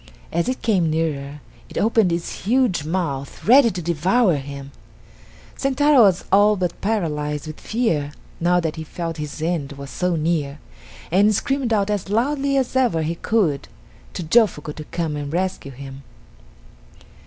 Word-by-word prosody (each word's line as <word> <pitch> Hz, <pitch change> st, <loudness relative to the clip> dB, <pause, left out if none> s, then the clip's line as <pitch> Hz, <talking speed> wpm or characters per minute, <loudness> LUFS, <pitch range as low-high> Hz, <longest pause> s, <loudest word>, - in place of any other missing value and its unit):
As 170 Hz, +7 st, 0 dB
it 255 Hz, -, -3 dB
came 185 Hz, -8 st, +2 dB
nearer 150 Hz, -3 st, -2 dB, 0.3 s
it -, -, -8 dB
opened 220 Hz, -4 st, +3 dB
its 170 Hz, +2 st, -4 dB
huge 240 Hz, -, +2 dB
mouth 155 Hz, -5 st, -3 dB
ready 250 Hz, +2 st, +7 dB
to 180 Hz, -4 st, -5 dB
devour 175 Hz, +6 st, +2 dB
him. 140 Hz, 0 st, -8 dB, 0.8 s
Sentaro 275 Hz, 0 st, +3 dB
was 195 Hz, -5 st, +4 dB
all 205 Hz, +2 st, +5 dB
but 180 Hz, -3 st, -3 dB
paralyzed 150 Hz, -8 st, -1 dB
with 155 Hz, 0 st, -8 dB
fear 165 Hz, -12 st, -1 dB, 0.3 s
now 175 Hz, +1 st, +3 dB
that 165 Hz, -2 st, -3 dB
he 160 Hz, -, -4 dB
felt 165 Hz, +1 st, -5 dB
his 150 Hz, +1 st, -5 dB
end 160 Hz, -5 st, -2 dB
so 180 Hz, +5 st, -1 dB
near, 155 Hz, -3 st, -1 dB, 0.5 s
and 205 Hz, +4 st, +4 dB
screamed 270 Hz, -1 st, -1 dB
out 210 Hz, -2 st, +1 dB
as 200 Hz, -2 st, -2 dB
loudly 275 Hz, +5 st, +1 dB
as 260 Hz, -1 st, -1 dB
ever 240 Hz, -11 st, +2 dB
he 160 Hz, +2 st, -1 dB
could 170 Hz, -6 st, 0 dB, 0.5 s
to 180 Hz, -, -4 dB
Jofuku 160 Hz, -5 st, +2 dB
to 155 Hz, -, -9 dB
come 160 Hz, -2 st, -3 dB
and 145 Hz, -1 st, -4 dB
rescue 180 Hz, -4 st, -2 dB
him. 135 Hz, +1 st, -10 dB
175 Hz, 155 wpm, -21 LUFS, 150-215 Hz, 0.8 s, ready